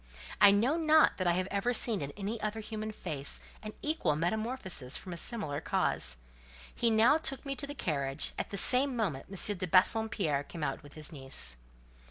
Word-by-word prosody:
I 205 - +9
know 230 +10 +2
not 315 -1 +4
that 185 - -1
I 175 - +3
have 185 +1 -1
ever 200 +5 0
seen 220 -4 +1
in 140 - -4
any 210 +3 -4
other 215 +1 -3
human 215 0 -5
face 140 -8 -5 0.2
an 215 0 -7
equal 300 - 0
metamorphosis 185 - 0
from 180 - -8
a - - -5
similar 170 -7 -2
cause. 65 - +1 0.6
He 235 - +2
now 230 +7 +4
took 275 -3 -1
me 275 0 -3
to 280 - -1
the 290 - -7
carriage: 140 - -1
at - - -3
the 200 - -4
same 255 +6 +4
moment 185 - -2
M. 195 +1 -1
de 185 0 -3
Bassompierre 185 -5 +2
came 160 +2 -8
out - - -2
with 145 -2 -15
his 155 -1 -4
niece. 135 - -2
200 Hz, 195 wpm, -31 LUFS, 155-235 Hz, 0.6 s, I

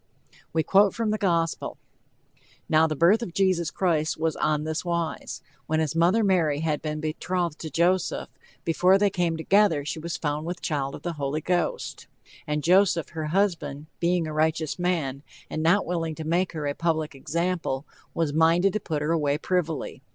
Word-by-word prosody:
We 160 0 +1
quote 195 +4 +4
from 225 -2 0
the 215 - -1
gospel: 170 -4 0 0.9
"Now 155 +1 +4
the 155 - -2
birth 180 +9 +4
of 185 -7 -6
Jesus 185 -4 +2
Christ 160 -3 0
was 160 0 0
on 150 -1 0
this 160 0 -2
wise: 170 -2 -3 0.2
When 155 0 +1
his 160 -1 -1
mother 180 +7 +3
Mary 165 -7 +2
had 155 -2 -1
been 155 -1 -3
betrothed 170 +1 -2
to 160 - -5
Joseph, 175 +5 +1 0.4
before 180 +3 +4
they 200 0 +2
came 175 -3 0
together 165 -3 +3
she 155 - -3
was 170 +2 -4
found 150 +1 -2
with 175 0 -4
child 140 -4 -2
of - - -11
the 175 - -2
Holy 140 +3 -1
Ghost. 180 - -2 0.4
And 150 0 -1
Joseph, 180 -1 +3
her 160 -2 -4
husband, 155 -5 0
being 175 0 +1
a 155 - -5
righteous 155 +1 0
man, 160 -7 -1 0.3
and 155 - -2
not 175 +5 +3
willing 165 -2 -2
to 160 - -6
make 175 +4 0
her 155 -2 -4
a 145 - 0
public 160 -1 -1
example, 165 -1 -2 0.3
was 160 -3 0
minded 165 +4 +4
to 215 - 0
put 155 -6 -3
her 155 - 0
away 150 -3 +1
privily. 165 -5 -2
165 Hz, 180 wpm, -26 LUFS, 155-180 Hz, 0.9 s, quote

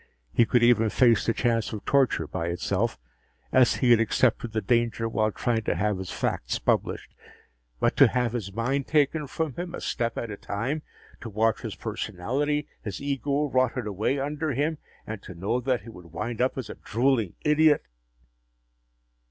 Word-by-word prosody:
He 115 - +4
could 120 +1 +3
even 115 -2 +5
face 115 -1 +3
the - - +4
chance 115 -2 0
of 105 -2 -6
torture 135 - +2
by 85 +2 -3
itself, 95 +6 -1 0.5
as 130 -2 +5
he 125 - +2
had 120 - +7
accepted 115 +1 +1
the 110 - 0
danger 115 +1 +1
while 110 -1 +1
trying 115 +1 0
to - - +1
have 100 +2 0
his 95 - -6
facts - - -2
published. - - -1 0.7
But - - +2
to - - +8
have 125 -2 0
his 105 -5 -3
mind 125 +6 -1
taken 150 0 +2
from 160 0 -2
him, 175 0 -4
a - - -6
step 115 -2 -2
at 115 - -3
a 100 - -6
time 125 +12 -3 0.4
to 120 - -7
watch 110 +1 +1
his - - -5
personality, 145 +10 -2
his 105 -5 -5
ego, 140 +1 -1
rotted 130 -1 +1
away 105 +6 -1
under 145 +2 -2
him 150 +4 -1 0.3
and 110 -2 -6
to 90 - -10
know 100 +8 -1
that 125 -3 0
he 115 - -10
would 90 -6 -12
wind 110 +7 -3
up 130 +2 +1
as 125 -5 -4
a - - -8
drooling 115 -4 +1
idiot.... 150 0 +4
120 Hz, 180 wpm, -26 LUFS, 110-135 Hz, 0.7 s, to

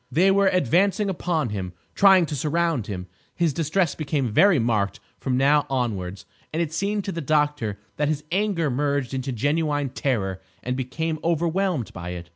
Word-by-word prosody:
They 180 +8 +4
were 200 0 +4
advancing 190 - +2
upon 165 -7 -1
him, 95 -3 -4 0.2
trying 190 -3 +6
to 150 - -4
surround 155 -3 0
him. 90 -3 -5 0.3
His 170 -4 +1
distress 165 +2 +1
became 140 -7 -2
very 195 - +5
marked 110 -5 0 0.2
from 130 -2 -1
now 145 +2 +3
onwards, 100 -8 -2 0.3
and 160 - -2
it 165 -2 -1
seemed 200 +4 -1
to 195 - -2
the 170 - -4
doctor 145 -8 0 0.2
that 150 - +1
his 150 -1 -2
anger 185 -6 +1
merged 140 -1 -1
into 130 0 -2
genuine 145 +3 0
terror 100 -8 -2 0.2
and 125 +1 -2
became 155 +5 -3
overwhelmed 170 - 0
by 85 -1 -6
it. 85 0 -10
150 Hz, 170 wpm, -24 LUFS, 125-170 Hz, 0.3 s, trying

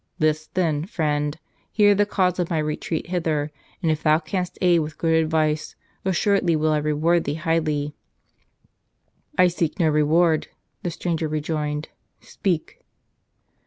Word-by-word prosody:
"List, 155 +1 0
then, 160 -4 +1
friend. 150 -6 -1 0.3
Hear 205 -2 +5
the 205 +1 +2
cause 185 -3 +1
of 175 - 0
my 165 - 0
retreat 155 +2 -2
hither, 155 -4 0 0.3
and 160 - +3
if 155 - -1
thou 155 -1 +4
canst 180 +3 -4
aid 175 -2 +4
with 155 -1 -4
good 165 -1 +1
advice, 155 -1 +1 0.3
assured¬ 190 +2 +2
ly 165 - +4
will 155 0 +1
I 155 - +2
reward 155 +3 +1
thee 145 - -1
highly." 155 -3 0 1.4
"I 180 - +6
seek 170 -3 -2
no 165 -3 +4
reward," 155 +2 +3 0.3
the 180 - -2
stranger 165 -1 -2
rejoined. 150 0 -2 0.3
"Speak." 175 -5 -3
160 Hz, 145 wpm, -23 LUFS, 150-175 Hz, 1.4 s, I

